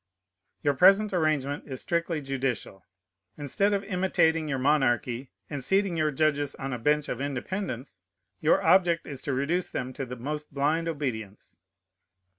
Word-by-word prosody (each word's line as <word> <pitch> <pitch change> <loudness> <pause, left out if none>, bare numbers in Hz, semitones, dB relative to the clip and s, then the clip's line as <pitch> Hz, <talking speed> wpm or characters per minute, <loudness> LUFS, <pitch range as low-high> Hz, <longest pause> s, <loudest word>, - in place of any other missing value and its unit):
Your 145 - +3
present 195 +7 +5
arrangement 150 -4 0
is 130 -3 -6
strictly 170 -3 -1
judicial. 130 -8 -3 0.5
Instead 150 +8 +1
of 200 -1 0
imitating 180 -5 +1
your 135 - 0
monarchy, 130 -2 +1 0.2
and 145 -3 -4
seating 195 +3 +2
your 155 -1 +2
judges 145 -1 0
on 135 0 -4
a 125 - -3
bench 150 +4 +2
of - - -4
independence, 140 - -4 0.4
your 155 - +3
object 175 -3 +4
is 140 -3 -6
to 145 - -3
reduce 155 +7 0
them 130 0 -4
to 135 - -4
the 125 - -6
most 150 +5 -5
blind 150 +4 0
obedience. 110 - -4
145 Hz, 150 wpm, -27 LUFS, 135-165 Hz, 0.5 s, present